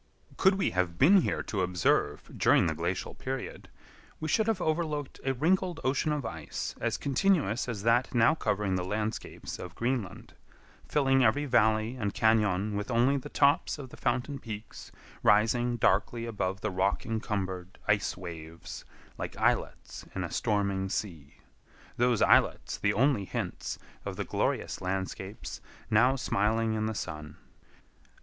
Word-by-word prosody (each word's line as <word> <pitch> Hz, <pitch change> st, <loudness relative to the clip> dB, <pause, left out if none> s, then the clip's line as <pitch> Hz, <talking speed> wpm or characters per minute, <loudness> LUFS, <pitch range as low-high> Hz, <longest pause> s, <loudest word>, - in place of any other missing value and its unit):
Could 190 Hz, 0 st, +4 dB
we 195 Hz, -, 0 dB
have 90 Hz, -2 st, -1 dB
been 180 Hz, +9 st, +7 dB
here -, -, -1 dB
to 100 Hz, -, -2 dB
observe 85 Hz, -5 st, 0 dB
during -, -, +4 dB
the 80 Hz, -, +1 dB
glacial 85 Hz, +3 st, -3 dB
period, 130 Hz, 0 st, -6 dB, 0.5 s
we 155 Hz, -, -3 dB
should 220 Hz, +7 st, +2 dB
have 220 Hz, -4 st, +1 dB
overlooked 155 Hz, -4 st, -2 dB
a 135 Hz, 0 st, 0 dB
wrinkled 175 Hz, +4 st, +1 dB
ocean 135 Hz, +4 st, +1 dB
of 150 Hz, -4 st, -2 dB
ice 80 Hz, -9 st, -5 dB
as -, -, 0 dB
continuous 140 Hz, -, +1 dB
as 105 Hz, -4 st, -4 dB
that 120 Hz, +2 st, +3 dB
now 115 Hz, +5 st, +5 dB
covering 105 Hz, -10 st, -1 dB
the 90 Hz, -1 st, 0 dB
landscapes 105 Hz, +3 st, -4 dB
of 90 Hz, -1 st, -8 dB
Greenland; 120 Hz, -5 st, -3 dB, 0.5 s
filling 135 Hz, -2 st, +3 dB
every 135 Hz, +6 st, +3 dB
valley 110 Hz, -1 st, +2 dB
and 105 Hz, -4 st, -2 dB
cañon 105 Hz, -2 st, +2 dB
with 105 Hz, +3 st, -3 dB
only 125 Hz, +3 st, +3 dB
the 140 Hz, +1 st, -4 dB
tops 145 Hz, +2 st, +2 dB
of 135 Hz, -3 st, -8 dB
the -, -, -10 dB
fountain 130 Hz, +3 st, -1 dB
peaks 110 Hz, -2 st, -8 dB, 0.3 s
rising 120 Hz, +4 st, +3 dB
darkly 115 Hz, +3 st, +1 dB
above 100 Hz, -4 st, -3 dB
the 110 Hz, -, -1 dB
rock 95 Hz, +2 st, 0 dB
encumbered 95 Hz, -5 st, -3 dB
ice 105 Hz, -1 st, +1 dB
waves 85 Hz, -2 st, -8 dB, 0.4 s
like -, -, -5 dB
islets -, -, -1 dB
in -, -, -2 dB
a -, -, -5 dB
stormy 100 Hz, -2 st, 0 dB
sea—those 105 Hz, -, -3 dB
islets -, -, +3 dB
the -, -, +2 dB
only 125 Hz, -3 st, +2 dB
hints -, -, -4 dB, 0.3 s
of -, -, -5 dB
the -, -, -3 dB
glorious -, -, -1 dB
landscapes 95 Hz, +2 st, -4 dB, 0.3 s
now 125 Hz, +5 st, +5 dB
smiling 110 Hz, -2 st, +1 dB
in 110 Hz, 0 st, -1 dB
the 110 Hz, -, -3 dB
sun. 75 Hz, -4 st, -6 dB
110 Hz, 150 wpm, -29 LUFS, 95-130 Hz, 0.5 s, been